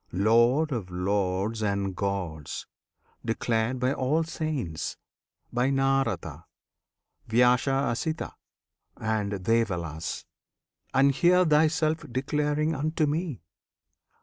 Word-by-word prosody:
Lord 120 - +3
of 110 -8 -3
Lords 95 +3 -1
and 100 -2 -1
Gods! 90 -6 -3 0.6
Declared 115 +1 0
by 130 +2 +1
all 145 +5 +1
the 165 - -9
Saints 140 - -3 0.6
by 125 +2 +2
Narada, 135 - 0 0.8
Vyasa 125 +3 +4 0.2
Asita, 155 +7 -2 0.6
and 110 -2 -1
Devalas; 90 -6 -1 0.7
And 135 +1 +4
here 180 +5 +4
Thyself 155 0 +2
declaring 150 +4 0
unto 155 +2 0
me! 150 - -2
120 Hz, 95 wpm, -27 LUFS, 100-150 Hz, 0.8 s, Vyasa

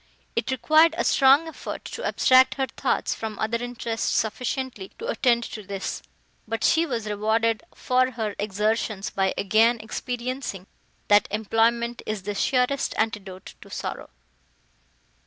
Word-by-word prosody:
It 230 +2 -1
required 310 +6 +4
a - - +1
strong 275 +4 +5
effort 320 - -7
to - - -6
abstract 260 +1 +4
her 270 - 0
thoughts - - -1
from 220 -2 -6
other 230 +2 -1
interests 235 -2 -3
sufficiently 235 -1 -2
to 455 - -7
attend 245 - +2
to 215 - -6
this, 195 -1 -5 0.5
but 225 0 -3
she 330 +1 +3
was 235 -6 -3
rewarded 220 +2 +1
for 255 0 +2
her 220 -4 -3
exertions 210 0 -1
by 190 -1 +1
again 225 +4 +3
experiencing, 245 -3 -4 0.4
that 205 0 +5
employment 230 +3 +1
is 215 -3 -3
the 205 +1 -3
surest 255 +5 +1
antidote 205 -4 -3
to - - -13
sorrow. - - -5
230 Hz, 140 wpm, -25 LUFS, 215-255 Hz, 0.5 s, strong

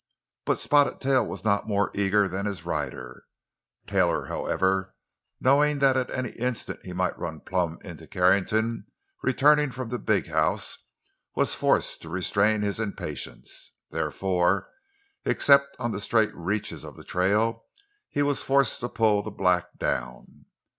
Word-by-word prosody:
But - - +1
Spotted 145 -1 +3
Tail 130 -2 +3
was - - -6
not 100 0 +1
more 100 -1 +1
eager 100 0 +2
than 95 +2 -3
his 100 -3 -5
rider. 65 -1 -4 0.6
Taylor, - - +1
however, 95 0 -1 0.4
knowing 145 +3 +3
that 135 -1 +4
at 130 -1 0
any 130 -3 -3
instant 125 -1 -3
he 90 - -8
might 90 0 -1
run 80 -2 -5
plump 90 -3 -2
into - - -10
Carrington, 105 +5 +1 0.3
returning 150 +3 +4
from 125 -1 -6
the 125 0 -3
big - - +1
house, - - 0 0.6
was - - +3
forced - - +1
to 80 - -10
restrain 100 +4 +1
his 100 +1 -1
impatience. 110 -3 -5 0.2
Therefore, 95 0 0 0.6
except 140 0 +4
on 120 -2 -2
the 105 -1 -4
straight 110 0 +2
reaches 95 +5 -3
of - - -10
the - - -11
trail, 105 +5 +1 0.4
he 145 - 0
was 145 -1 +1
forced 135 0 +2
to 120 - -4
pull 105 -2 +2
the 110 - -6
black 90 -3 0
down. 60 0 -4
105 Hz, 145 wpm, -26 LUFS, 95-125 Hz, 0.6 s, that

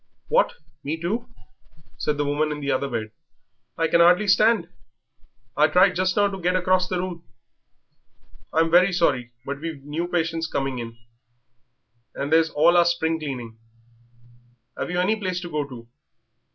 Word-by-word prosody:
"What, - - +3 0.3
me 155 +3 -3
too?" 220 +9 -3 0.7
said 150 - -1
the 145 - 0
woman 150 +2 0
in 150 - -4
the 140 -1 -2
other 135 +1 -1
bed. 110 -3 -4 0.7
"I 165 - +1
can 170 - +2
hardly 180 +5 +5
stand; 215 -2 +3 0.9
I - - +5
tried 185 +2 +4
just 185 +1 0
now 205 0 +4
to 195 -1 -6
get 180 +1 +1
across 185 0 +2
the 185 - -2
room." 175 -2 -5 1.3
"I'm 165 +1 +2
very 180 +2 +5
sorry, 130 -8 +1
but 140 0 -5
we've 160 -4 -6
new 155 +4 -3
patients 165 -2 -1
coming, 125 -6 -4 1.2
and 140 +3 -2
there's 165 0 +4
all 165 +3 +4
our 175 - +5
spring 165 -1 0
cleaning. 125 -7 -6 1.2
Have - - -4
you 180 0 -1
any 195 +5 +2
place 185 -4 -3
to 175 -1 -8
go 150 -2 -2
to?" 120 -3 -11
165 Hz, 160 wpm, -23 LUFS, 145-180 Hz, 1.3 s, hardly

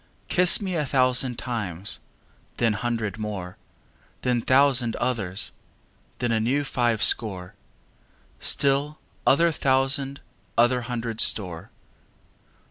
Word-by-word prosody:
Kiss 180 0 +5
me 190 -3 -4
a 160 -3 0
thousand 130 -2 +1
times, 105 -7 -3 0.6
then 115 -2 +2
hundred 110 -1 -3
more, 95 -4 -6 0.7
Then 125 -2 +1
thousand 130 -2 +3
others, 110 -7 -2 0.7
then 120 -1 -1
a 110 - +1
new 130 +6 0
five 120 -5 0
score, 95 -6 +2 0.9
Still 140 +2 +1 0.3
other 170 +5 +4
thousand 135 -1 0 0.4
other 120 +1 +3
hundred 115 -1 -3
store. 90 -2 +1
120 Hz, 105 wpm, -24 LUFS, 110-135 Hz, 0.9 s, Kiss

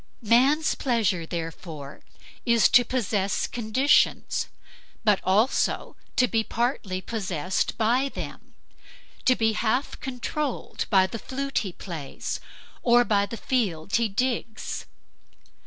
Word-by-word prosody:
Man's 265 +8 +4
pleasure, 215 - 0
therefore, 160 -4 -6 0.4
is 235 -2 +4
to 245 -2 +7
possess 210 -5 0
conditions, 245 +5 +2 0.6
but 210 -3 +4
also 210 +7 +1 0.2
to 250 - +4
be 225 -1 +1
partly 225 -6 -1
possessed 185 -5 -2
by 245 +5 +2
them; - - -8 0.7
to 255 - +5
be 225 -2 +2
half 235 +6 0
controlled 265 +2 -3
by 190 -3 +5
the 220 +4 -5
flute 275 +3 -2
he 195 - -4
plays 165 -6 -5 0.4
or 240 0 +5
by 205 -3 +2
the 230 - -6
field 200 -8 0
he 230 -2 +1
digs. 225 +1 -2
225 Hz, 115 wpm, -26 LUFS, 190-250 Hz, 0.7 s, to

